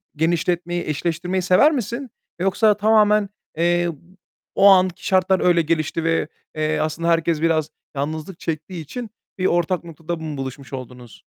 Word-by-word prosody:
genişletmeyi, 175 Hz, +2 st, 0 dB
eşleştirmeyi 170 Hz, +4 st, -1 dB
sever 185 Hz, -, +5 dB
misin? 245 Hz, 0 st, -3 dB, 0.3 s
Yoksa 200 Hz, +3 st, +3 dB
tamamen, 210 Hz, -1 st, +4 dB, 0.3 s
eee, 175 Hz, +1 st, +2 dB, 0.7 s
o 200 Hz, -, +6 dB
anki 185 Hz, -2 st, +4 dB
şartlar 185 Hz, 0 st, +3 dB
öyle 175 Hz, -1 st, +4 dB
gelişti 160 Hz, 0 st, -1 dB
ve, 165 Hz, -2 st, +1 dB, 0.3 s
eee, 155 Hz, 0 st, 0 dB
aslında 155 Hz, +2 st, -2 dB
herkes 165 Hz, -1 st, +1 dB
biraz 160 Hz, -2 st, +1 dB, 0.3 s
yalnızlık 155 Hz, +5 st, -4 dB
çektiği 165 Hz, +2 st, -4 dB
için 230 Hz, -, -7 dB, 0.3 s
bir 185 Hz, -, -1 dB
ortak 175 Hz, +1 st, +1 dB
noktada 165 Hz, 0 st, -6 dB
mı 155 Hz, -3 st, -6 dB
buluşmuş 135 Hz, +1 st, -7 dB
oldunuz? 125 Hz, -2 st, -8 dB
170 Hz, 140 wpm, -21 LUFS, 155-185 Hz, 0.7 s, o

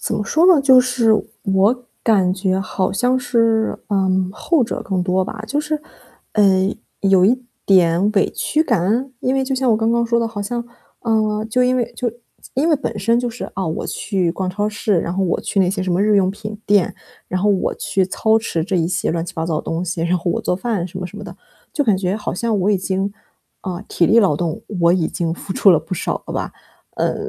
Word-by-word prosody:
怎 -, -, -2 dB
么 210 Hz, -, -2 dB
说 320 Hz, -, +3 dB
呢， 360 Hz, -6 st, +6 dB
就 260 Hz, -2 st, +7 dB
是 250 Hz, -3 st, +2 dB, 0.3 s
我 205 Hz, +5 st, +2 dB, 0.2 s
感 190 Hz, -5 st, +3 dB
觉 190 Hz, 0 st, 0 dB
好 190 Hz, 0 st, -1 dB
像 250 Hz, +5 st, +1 dB
是， 230 Hz, -3 st, +1 dB
嗯， 190 Hz, -2 st, +1 dB
后 295 Hz, -, +1 dB
者 -, -, -4 dB
更 190 Hz, -2 st, -1 dB
多 185 Hz, +1 st, +1 dB
吧。 215 Hz, +2 st, -7 dB
就 285 Hz, +6 st, -1 dB
是， 305 Hz, 0 st, -3 dB, 0.5 s
嗯， 195 Hz, -1 st, +3 dB, 0.3 s
有 195 Hz, -2 st, +4 dB
一 250 Hz, +6 st, +2 dB, 0.2 s
点 185 Hz, +1 st, +4 dB
委 200 Hz, -, +2 dB
屈 310 Hz, -, 0 dB
感？ 230 Hz, -, 0 dB
因 255 Hz, -, 0 dB
为 270 Hz, 0 st, +1 dB
就 265 Hz, -, -1 dB
像 260 Hz, -1 st, +1 dB
我 220 Hz, -, +4 dB
刚 225 Hz, +1 st, +1 dB
刚 235 Hz, 0 st, +2 dB
说 235 Hz, 0 st, +2 dB
的， 230 Hz, -, 0 dB
好 225 Hz, -2 st, -6 dB
像， 235 Hz, +4 st, -3 dB, 0.4 s
呃， 215 Hz, -2 st, 0 dB
就 250 Hz, +3 st, +2 dB
因 255 Hz, +1 st, +2 dB
为 240 Hz, -1 st, -1 dB
就 240 Hz, +1 st, -1 dB
是 235 Hz, +1 st, -11 dB, 0.4 s
因 295 Hz, +6 st, +1 dB
为 315 Hz, -, +5 dB
本 265 Hz, -6 st, -4 dB
身 230 Hz, +4 st, +2 dB
就 245 Hz, -, -2 dB
是， 235 Hz, +1 st, -6 dB
啊， 190 Hz, -2 st, -2 dB
我 160 Hz, -, -3 dB
去 185 Hz, -5 st, -1 dB
逛 185 Hz, +1 st, -3 dB
超 205 Hz, +3 st, -1 dB
市， 205 Hz, -3 st, 0 dB
然 170 Hz, -, -3 dB
后 195 Hz, -, 0 dB
我 180 Hz, -, 0 dB
去 200 Hz, -, -1 dB
那 180 Hz, -, +3 dB
些 190 Hz, 0 st, -2 dB
什 185 Hz, -1 st, -1 dB
么 185 Hz, -, +2 dB
日 210 Hz, 0 st, +3 dB
用 190 Hz, -2 st, +3 dB
品 210 Hz, +1 st, -7 dB
店， 205 Hz, -3 st, +2 dB, 0.3 s
然 185 Hz, -, -2 dB
后 210 Hz, -, +3 dB
我 195 Hz, -2 st, 0 dB
去 190 Hz, -2 st, 0 dB
操 220 Hz, +3 st, +2 dB
持 170 Hz, -8 st, -2 dB
这 195 Hz, +2 st, -3 dB
一 165 Hz, -1 st, +1 dB
些 175 Hz, -2 st, -1 dB
乱 165 Hz, 0 st, -2 dB
七 175 Hz, +1 st, -9 dB
八 160 Hz, -, -2 dB
糟 165 Hz, -2 st, -1 dB
的 -, -, -3 dB
东 165 Hz, +2 st, -3 dB
西， 170 Hz, -1 st, -3 dB
然 170 Hz, +2 st, +1 dB
后 175 Hz, 0 st, -2 dB
我 -, -, -1 dB
做 180 Hz, -, -1 dB
饭 205 Hz, -4 st, -2 dB
什 185 Hz, -, -8 dB
么 180 Hz, -, -4 dB
什 205 Hz, -, -12 dB
么 210 Hz, -, -8 dB
的。 -, -, -9 dB, 0.4 s
就 290 Hz, -, +1 dB
感 215 Hz, -5 st, +3 dB
觉 190 Hz, +1 st, -1 dB
好 215 Hz, -, -4 dB
像 220 Hz, +3 st, -1 dB
我 195 Hz, +2 st, +1 dB
已 200 Hz, -, +2 dB
经， 190 Hz, +1 st, -2 dB, 0.5 s
呃， 185 Hz, 0 st, -5 dB
体 170 Hz, -, +1 dB
力 225 Hz, -, +5 dB
劳 195 Hz, -9 st, +4 dB
动， 165 Hz, +1 st, -3 dB, 0.2 s
我 170 Hz, 0 st, +5 dB
已 175 Hz, -3 st, +1 dB
经 165 Hz, -1 st, -2 dB
付 190 Hz, -, -6 dB
出 195 Hz, -, +5 dB
了 170 Hz, -, +5 dB
不 160 Hz, +3 st, -10 dB
少 180 Hz, -, -2 dB
了 -, -, -6 dB
吧。 -, -, -3 dB, 0.4 s
呃， -, -, 0 dB
200 Hz, 260 characters per minute, -19 LUFS, 185-230 Hz, 0.5 s, 就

